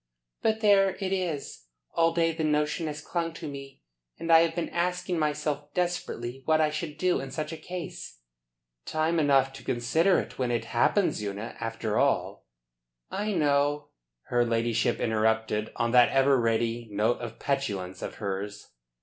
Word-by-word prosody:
"But 220 Hz, 0 st, +1 dB
there 195 Hz, -3 st, +5 dB
it 190 Hz, -1 st, -1 dB
is. 165 Hz, -, -3 dB, 0.3 s
All 165 Hz, 0 st, +3 dB
day 165 Hz, 0 st, +2 dB
the 160 Hz, 0 st, -3 dB
notion 150 Hz, +2 st, +1 dB
has 150 Hz, 0 st, -5 dB
clung 165 Hz, -2 st, -2 dB
to 165 Hz, -1 st, -7 dB
me, 140 Hz, -1 st, -9 dB, 0.3 s
and 165 Hz, -, -2 dB
I 165 Hz, -, +9 dB
have 165 Hz, 0 st, +2 dB
been 170 Hz, -, -2 dB
asking 180 Hz, 0 st, -1 dB
myself 150 Hz, -1 st, -1 dB
desperately 135 Hz, -8 st, -2 dB
what 160 Hz, 0 st, +3 dB
I 155 Hz, -1 st, +3 dB
should 155 Hz, -1 st, -4 dB
do 180 Hz, +2 st, +2 dB
in 135 Hz, -, -6 dB
such 155 Hz, +3 st, -4 dB
a -, -, -4 dB
case." 165 Hz, -, -7 dB, 0.7 s
"Time 160 Hz, +2 st, +1 dB
enough 135 Hz, -3 st, +3 dB
to 135 Hz, -, -11 dB
consider 160 Hz, +10 st, +2 dB
it -, -, -7 dB
when 125 Hz, -2 st, 0 dB
it 120 Hz, -1 st, -1 dB
happens, 120 Hz, -, +2 dB
Una. 105 Hz, +2 st, -5 dB
After 115 Hz, -1 st, -2 dB
all -, -, 0 dB, 0.3 s
" -, -, -59 dB, 0.3 s
"I 210 Hz, +1 st, -1 dB
know," 145 Hz, -2 st, +1 dB, 0.3 s
her 120 Hz, 0 st, +1 dB
ladyship 115 Hz, 0 st, +1 dB
interrupted 110 Hz, -1 st, 0 dB
on 115 Hz, 0 st, 0 dB
that 125 Hz, -1 st, +6 dB
ever 135 Hz, -1 st, +4 dB
ready 115 Hz, 0 st, 0 dB
note 110 Hz, +4 st, +1 dB
of 115 Hz, -1 st, -6 dB
petulance 100 Hz, -10 st, -2 dB
of -, -, -5 dB
hers. 100 Hz, 0 st, -5 dB
145 Hz, 165 wpm, -28 LUFS, 115-165 Hz, 0.7 s, I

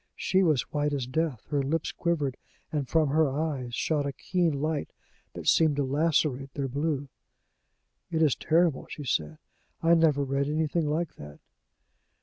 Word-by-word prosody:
She 190 Hz, -, +2 dB
was 155 Hz, -9 st, +3 dB
white 145 Hz, 0 st, 0 dB
as 135 Hz, -3 st, -1 dB
death, 140 Hz, -2 st, -2 dB
her 145 Hz, -1 st, +2 dB
lips 150 Hz, +4 st, -1 dB
quivered, 150 Hz, -7 st, -1 dB, 0.4 s
and 145 Hz, -5 st, -2 dB
from 160 Hz, -3 st, +3 dB
her 155 Hz, +1 st, +3 dB
eyes 135 Hz, -4 st, -2 dB
shot 145 Hz, +1 st, 0 dB
a -, -, -2 dB
keen 165 Hz, -1 st, 0 dB
light 155 Hz, 0 st, -1 dB, 0.5 s
that -, -, -7 dB
seemed 160 Hz, -3 st, +4 dB
to 145 Hz, -, +1 dB
lacerate 140 Hz, -1 st, +1 dB
their 140 Hz, -2 st, -1 dB
blue. 145 Hz, +1 st, -2 dB, 1.0 s
"It 160 Hz, -2 st, +1 dB
is 150 Hz, -5 st, +3 dB
terrible!" 165 Hz, -3 st, +1 dB
she 150 Hz, -, -7 dB
said. 75 Hz, -, -1 dB, 0.5 s
"I 165 Hz, +1 st, +5 dB
never 155 Hz, -4 st, +4 dB
read 140 Hz, +1 st, 0 dB
anything 155 Hz, +1 st, 0 dB
like 160 Hz, +2 st, -2 dB
that." 75 Hz, 0 st, -11 dB
150 Hz, 160 wpm, -28 LUFS, 135-160 Hz, 1.0 s, I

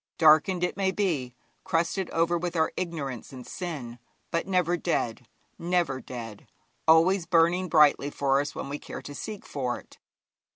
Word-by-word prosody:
Darkened 160 Hz, +3 st, +5 dB
it 180 Hz, -, 0 dB
may 195 Hz, 0 st, +1 dB
be, 160 Hz, -11 st, -1 dB, 0.3 s
crusted 170 Hz, +3 st, 0 dB
over 165 Hz, +1 st, +1 dB
with 175 Hz, 0 st, -2 dB
our 160 Hz, -1 st, +2 dB
ignorance 150 Hz, -9 st, -4 dB
and 130 Hz, -2 st, -9 dB
sin, 140 Hz, -10 st, -6 dB, 0.3 s
but 165 Hz, -, -1 dB
never 180 Hz, -2 st, +2 dB
dead, 125 Hz, -9 st, -2 dB, 0.3 s
never 170 Hz, -6 st, 0 dB
dead, 115 Hz, -4 st, -8 dB, 0.4 s
always 165 Hz, +3 st, +5 dB
burning 175 Hz, +2 st, +3 dB
brightly 150 Hz, -2 st, +5 dB
for 140 Hz, -1 st, +1 dB
us 145 Hz, -, -5 dB
when -, -, -5 dB
we 145 Hz, +1 st, -4 dB
care -, -, -8 dB
to 145 Hz, -, -8 dB
seek 210 Hz, +7 st, -7 dB
for 125 Hz, -4 st, -2 dB
it. -, -, -19 dB
165 Hz, 160 wpm, -27 LUFS, 140-180 Hz, 0.4 s, Darkened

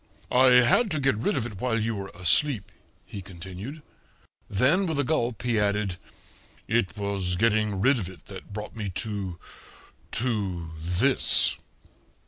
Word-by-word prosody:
"I 130 Hz, +1 st, +5 dB, 0.2 s
had 220 Hz, -, +3 dB
to 155 Hz, -4 st, -1 dB
get 135 Hz, -1 st, +2 dB
rid 115 Hz, -, -1 dB
of 120 Hz, -, -1 dB
it 105 Hz, -5 st, -8 dB
while 120 Hz, -3 st, 0 dB
you 115 Hz, +1 st, -1 dB
were 100 Hz, -2 st, -6 dB
asleep," 100 Hz, -, +3 dB, 0.3 s
he 100 Hz, -, -8 dB
continued. 95 Hz, -, -9 dB, 0.7 s
Then, 145 Hz, -, +2 dB
with 160 Hz, -3 st, -2 dB
a -, -, +3 dB
gulp, 125 Hz, -6 st, -1 dB
he 120 Hz, -3 st, +1 dB
added, 100 Hz, -2 st, 0 dB, 0.7 s
"It 110 Hz, -3 st, 0 dB
was 100 Hz, -3 st, -2 dB
getting 105 Hz, -1 st, +1 dB
rid 130 Hz, +4 st, +3 dB
of 95 Hz, -4 st, -5 dB
it 90 Hz, -4 st, -14 dB
that -, -, -11 dB
brought 105 Hz, +1 st, -7 dB
me 105 Hz, -3 st, -4 dB
to 100 Hz, -5 st, -3 dB, 0.8 s
to 100 Hz, -9 st, -1 dB
this." 90 Hz, +11 st, +4 dB
105 Hz, 150 wpm, -26 LUFS, 95-125 Hz, 0.8 s, I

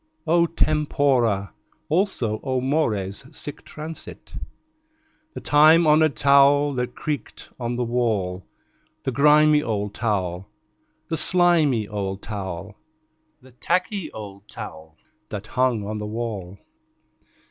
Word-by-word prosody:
O 170 Hz, +1 st, +3 dB
tempora! 140 Hz, -10 st, +1 dB, 0.3 s
Also, 155 Hz, -, 0 dB
O 130 Hz, -2 st, 0 dB
mores! 115 Hz, -8 st, -1 dB
Sic 145 Hz, -1 st, -7 dB
transit 155 Hz, +1 st, -9 dB, 1.0 s
The -, -, -6 dB
time 155 Hz, +3 st, +6 dB
honored 155 Hz, -1 st, +4 dB
towel 140 Hz, +1 st, +5 dB
that 125 Hz, -1 st, -3 dB
creaked 150 Hz, -2 st, -5 dB
on 120 Hz, 0 st, -2 dB
the 125 Hz, -, -1 dB
wall. 110 Hz, -7 st, -1 dB, 0.6 s
The 130 Hz, -, -1 dB
grimy 150 Hz, +2 st, +5 dB
old 105 Hz, -5 st, -2 dB
towel, 95 Hz, -5 st, -2 dB, 0.6 s
the 160 Hz, -, -1 dB
slimy 160 Hz, -, +3 dB
old 100 Hz, -1 st, -4 dB
towel, 100 Hz, -1 st, -6 dB, 0.7 s
The 130 Hz, -, -17 dB
tacky 180 Hz, -, -1 dB
old 100 Hz, -1 st, -10 dB
towel 80 Hz, -7 st, -10 dB, 0.3 s
that 105 Hz, -2 st, -6 dB
hung 125 Hz, -2 st, 0 dB
on 105 Hz, +1 st, -4 dB
the 105 Hz, -, -4 dB
wall. 105 Hz, -4 st, -5 dB
125 Hz, 115 wpm, -23 LUFS, 105-150 Hz, 1.0 s, time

